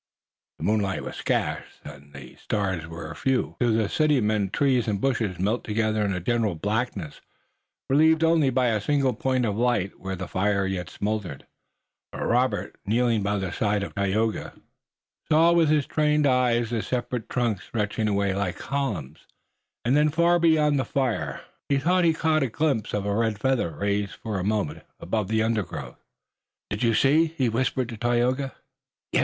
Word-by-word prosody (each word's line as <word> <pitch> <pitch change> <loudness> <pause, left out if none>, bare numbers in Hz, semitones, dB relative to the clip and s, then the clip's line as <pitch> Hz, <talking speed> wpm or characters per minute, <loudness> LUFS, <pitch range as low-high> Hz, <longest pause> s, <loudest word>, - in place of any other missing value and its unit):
The - - -8
moonlight 105 -3 0
was - - -7
scant - - -1 0.2
and 70 +1 -12
the 65 -2 -11
stars 95 -6 -2
were 80 -1 -7
few. 130 +9 -1
To 120 - +2
the 110 -1 +2
city 150 +1 +2
men 105 -3 +1
trees 130 +1 +1
and 100 -2 0
bushes 115 -7 0
melted 105 +7 -1
together 110 0 0
in 100 - 0
a 90 - -2
general 110 0 0
blackness, 100 -3 -3 0.7
relieved 160 +4 +4
only 160 -4 +4
by 125 -1 +2
a 110 -2 0
single 135 +1 +1
point 130 +1 0
of 105 -3 -1
light 115 -5 0
where 95 0 -4
the 95 0 -6
fire 100 +1 0
yet 95 -2 -3
smoldered, 100 -9 -4 0.7
but - - -5
Robert, 120 -3 0
kneeling 115 +1 +1
by 100 +1 0
the 95 -2 -3
side 105 0 0
of - - -6
Tayoga, 105 +3 -1 0.8
saw 165 +2 +6
with 170 -2 +4
his 150 -2 +3
trained 150 -1 +2
eyes 120 -3 +2
the 115 -2 0
separate 120 +1 -3
trunks 115 -6 -1
stretching 110 0 -2
away 100 -1 +1
like 95 -2 -2
columns, 125 - -4 0.6
and 125 +3 +3
then 150 +1 +4
far 170 +3 +3
beyond 155 -4 +3
the - - +1
fire 125 -4 -2 0.3
he 140 - +3
thought 180 +6 +2
he 165 - +5
caught 155 -1 +1
a 135 - 0
glimpse 135 -4 0
of 100 -1 -2
a 100 0 0
red 110 -1 0
feather 130 -4 +1
raised 100 +5 -2
for 105 -4 -4
a - - -2
moment 105 -6 -1 0.2
above 105 +3 -2
the 110 +1 +1
undergrowth. 110 -4 -3 0.7
"Did 100 - -3
you 115 -2 +3
see!" 155 +7 +3
he 130 -3 +2
whispered 125 +2 0
to 115 - -7
Tayoga. 120 +4 0 0.6
"Yes. - - +2
115 Hz, 175 wpm, -25 LUFS, 100-135 Hz, 0.8 s, saw